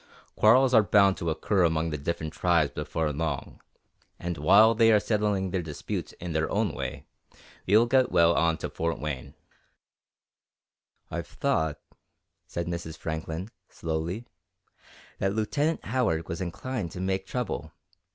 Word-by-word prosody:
Quarrels 130 +4 +5
are 110 - +8
bound 100 -1 +4
to 85 - -2
occur 90 +4 +1
among 80 -1 +1
the 75 - -2
different 80 +1 -3
tribes 85 -5 +2
before 80 -2 -2
long, 75 -1 -4 0.6
and 85 0 -4
while 100 +9 +6
they 115 0 +5
are 105 - +6
settling 105 -3 0
their 95 -1 0
disputes 80 -3 -5
in 90 -1 -7
their 80 0 0
own - - 0
way, - - -5 0.6
we'll 110 +5 +5
get 130 +1 +3
well 85 0 +5
on 85 -1 +2
to - - -4
Fort 85 0 -2
Wayne." 75 -4 -5 1.8
"I've - - -4
thought," 80 -2 -1 0.7
said 85 - -3
Mrs. 85 -2 -5
Franklin, 80 +5 -5 0.2
slowly, 85 +7 -3 0.9
"that 95 +1 0
Lieutenant 145 +9 0
Howard 105 -9 0
was 85 - -4
inclined 95 +3 -4
to - - -7
make 95 +1 -2
trouble. 115 -10 -3
85 Hz, 140 wpm, -27 LUFS, 80-105 Hz, 1.8 s, are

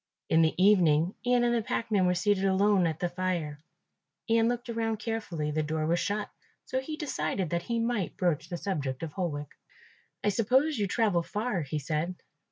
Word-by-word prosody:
In 160 - +5
the 160 -1 +3
evening 180 -3 +4
Ian 245 0 +3
and 240 0 +2
the 235 - +2
packman 220 -5 0
were 180 - +2
seated 195 +1 +1
alone 195 -1 +3
at 160 -1 -3
the 175 - 0
fire. 175 -4 -2 0.7
Ian 230 0 +3
looked 245 +1 -2
around 225 -1 -1
carefully, 205 -9 -3
the 155 +1 0
door 155 +1 -1
was 170 +2 +2
shut, 205 +1 -2 0.3
so 260 - -1
he 305 +4 -5
decided 195 - -2
that 170 0 0
he 235 +6 -2
might 230 -5 -1
broach 170 -3 0
the 175 - -3
subject 145 -8 -3
of 155 -3 -5
Holwick. 150 -6 -3 0.7
"I 205 - +3
suppose 255 +7 +2
you 205 - +1
travel 205 -4 +2
far," 210 +1 -2
he 150 +1 -3
said. 155 +5 -2
190 Hz, 185 wpm, -29 LUFS, 165-225 Hz, 0.7 s, In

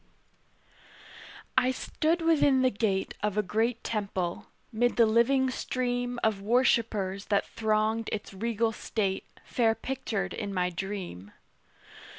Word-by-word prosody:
I 255 0 +4
stood 320 +5 0
within 290 -5 +4
the 255 - +4
gate 200 -2 0
Of 210 -1 -1
a 210 - +3
great 225 +4 0
temple, 195 -5 -2 0.2
'mid 245 +2 +1
the 230 - +6
living 255 +4 +3
stream 245 -1 -2
Of 215 -3 +1
worshipers 215 -4 +1
that 200 -2 +1
thronged 220 0 0
its 210 -2 -4
regal 225 +2 0
state 200 -3 -2 0.2
Fair 225 -2 +2
pictured 225 -9 -3
in 200 -2 -4
my 180 0 +1
dream. 180 - -6
220 Hz, 125 wpm, -29 LUFS, 200-245 Hz, 0.2 s, the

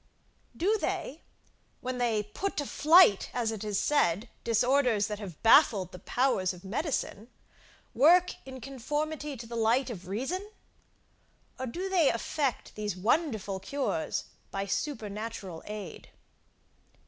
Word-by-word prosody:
Do 420 +5 +2
they, 310 -4 -3 0.6
when 255 0 -4
they 225 -3 +1
put 380 - -4
to 290 - 0
flight, 310 - +5
as 235 -3 0
it 220 -2 -5
is 205 -2 -1
said, 215 - +1
disorders 245 -1 +3
that 210 -1 -4
have 185 -7 -9
baffled 225 - +5
the 180 - -10
powers 195 -5 +1
of 180 - -15
medicine, 230 - -3 0.7
work 350 +8 +5
in 260 -1 -9
conformity 295 +3 -3
to 235 - -8
the 235 +1 -7
light 235 +3 +2
of 185 -5 -8
reason? 310 - -3 1.1
Or 260 - -3
do 360 +11 -4
they 360 -6 +4
effect 270 +3 -2
these 210 -3 -3
wonderful 215 - 0
cures 275 +9 -2 0.3
by 195 0 -3
supernatural 210 - -4
aid? 210 -1 -7
235 Hz, 130 wpm, -29 LUFS, 205-290 Hz, 1.1 s, flight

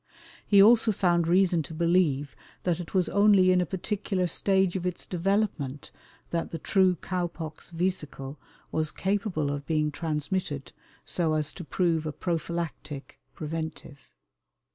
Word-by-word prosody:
He 200 -1 +7
also 225 +1 +6
found 175 -4 +2
reason 180 -1 +4
to 155 +2 -8
believe 165 -4 +2 0.3
that 175 -2 0
it 175 +2 -7
was 185 -2 +3
only 200 -2 +5
in 180 0 +4
a 180 - -1
particular 190 0 -2
stage 190 +1 +2
of 185 - -2
its 180 -1 -3
development 180 -7 -1 0.4
that 170 -1 -1
the 165 - -4
true 185 0 +3
cow 180 +1 -2
pox 160 -2 -8
vesicle 155 -6 -3 0.3
was 155 -1 0
capable 190 -7 -1
of 140 -1 -5
being 155 -1 +1
transmitted 150 -1 -3 0.3
so 160 -3 0
as 150 -1 -1
to 180 - -8
prove 165 -2 0
a - - -2
prophylactic 165 -4 -4 0.2
[preventive]. 160 -2 -5
170 Hz, 140 wpm, -27 LUFS, 155-185 Hz, 0.4 s, He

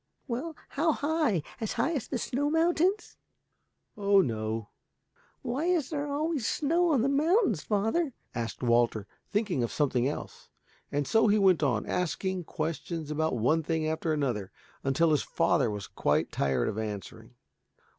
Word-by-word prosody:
"Well, 285 +6 -3
how 320 +2 +1
high? 290 - 0 0.2
As 220 - -2
high 330 - 0
as 275 -8 -3
the 260 - -2
snow 275 +4 -1
mountains?" 345 +5 +1 0.8
"Oh 200 -1 +4
no." 110 - -2 0.7
"Why 265 +5 -2
is 340 -6 +1
there 290 -1 -2
always 295 -4 -1
snow 335 +3 +2
on 260 -6 +3
the - - +2
mountains, 290 - +2
father?" 225 +9 0 0.2
asked 115 0 -4
Walter, 120 -3 +2 0.2
thinking 205 - 0
of 120 - -1
something 130 -4 +1
else. 145 - -6 0.4
And 145 0 0
so 225 0 +4
he 210 0 +4
went 190 -5 +4
on, 125 -8 +1
asking 180 +1 -2
questions 160 0 -4
about 155 -3 0
one 150 +9 +2
thing 160 0 -1
after 160 +1 -1
another, 125 -10 -1 0.3
until 150 +5 +2
his 150 - +3
father - - +1
was 105 -1 -4
quite 75 +2 0
tired 65 -3 0
of 105 - -2
answering. 105 -3 -6
185 Hz, 155 wpm, -29 LUFS, -, 0.8 s, Oh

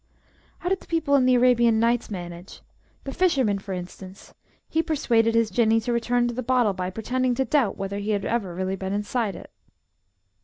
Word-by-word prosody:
How 355 - -3
did 385 0 0
the - - -18
people 320 -4 0
in 265 -2 +4
"The 255 - +5
Arabian 240 -2 +4
Nights" 235 +1 +1
manage? 175 -2 -8 0.4
The 270 - -6
fisherman, 265 - +1
for 195 0 -9
instance? 185 +1 -9 0.3
He 320 - +1
persuaded 230 -8 +1
his 230 -1 +2
Jinnee 225 -1 +3
to 240 +2 -2
return 240 +1 +1
to 240 - -3
the 255 - -3
bottle 245 -4 +2
by 180 -1 -3
pretending 245 +5 -1
to 265 +1 0
doubt 265 -9 +1
whether 195 +1 -4
he 205 +1 -4
had 205 -2 0
ever 200 -7 -2
really 190 +1 -2
been 190 0 -4
inside 205 0 -2
it. - - -11
230 Hz, 195 wpm, -24 LUFS, 195-255 Hz, 0.4 s, The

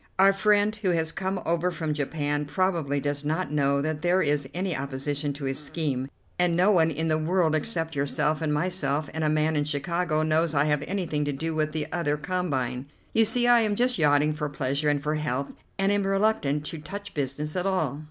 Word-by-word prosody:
Our 195 +1 +6
friend 205 +2 +3
who 205 -3 -1
has 160 -2 +1
come 190 +2 -2
over 170 +2 +1
from 160 -3 -2
Japan 145 0 -1
probably 165 -4 0
does 145 +1 -2
not 160 +3 -1
know 140 -1 +2
that 155 -1 -2
there 180 +1 +3
is 145 -5 +1
any 180 +2 -2
opposition 140 +2 -2
to 140 +1 -9
his 135 +1 -1
scheme, 140 -3 -2 0.3
and 175 -1 +3
no 185 +4 +5
one 165 -5 +4
in 160 +1 -1
the 155 0 +1
world 165 0 +2
except 160 0 -1
yourself 150 +2 0
and 155 -2 0
myself 150 -2 -1
and 160 0 -2
a 155 - +2
man 155 +1 +1
in 145 - +2
Chicago 155 +2 0
knows 155 0 +1
I 140 +1 +3
have 150 -1 +1
anything 170 -6 -1
to 145 - -1
do 160 +4 -3
with 155 -1 0
the 155 -1 -2
other 150 -3 0
combine. 140 -7 -2 0.3
You 225 - +5
see 240 +3 +1
I 240 0 +6
am 215 -2 +1
just 245 -1 +1
yachting 150 0 +3
for 150 -1 -3
pleasure 140 +1 -1
and 145 -1 0
for 150 +1 0
health, 140 -3 -2 0.2
and 195 0 +2
am 200 -1 +1
reluctant 195 -8 +1
to 160 - -4
touch 200 +6 -7
business 145 +2 -3
at 180 +1 0
all. 155 -8 0
155 Hz, 210 wpm, -26 LUFS, 145-180 Hz, 0.3 s, Our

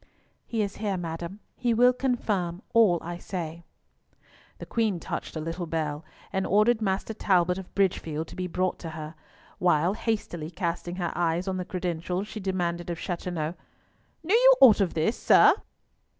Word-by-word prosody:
"He 225 -2 0
is 200 -1 -5
here, 205 -3 -1
madam. 170 +3 -5
He 240 -2 0
will 245 +2 +6
confirm 210 -8 -1
all 220 -7 +5
I 175 +1 -5
say." 170 -3 -6 0.9
The - - -8
Queen 220 -6 0
touched - - -5
a - - -2
little 165 +2 -4
bell, 155 -2 -2 0.3
and 190 0 0
ordered 215 +3 +3
Master 195 +2 -1
Talbot 180 -3 +2
of 190 - -11
Bridgefield 165 -5 0
to - - -10
be 185 0 -3
brought 185 +1 -1
to 165 - -6
her, 155 0 -6 0.5
while, 175 0 +3
hastily 205 -8 -3
casting 175 0 -3
her 175 -2 -2
eyes 175 +1 0
on 190 -1 -1
the 180 - -3
credentials, 180 0 -3
she 215 - -7
demanded 175 -3 -2
of 170 - -3
Chateauneuf, 170 -3 -3 0.7
"Knew 355 +5 0
you - - +8
aught 230 -6 +8
of 190 - 0
this, 165 +8 +1
sir?" - - +7
180 Hz, 165 wpm, -27 LUFS, 170-205 Hz, 0.9 s, you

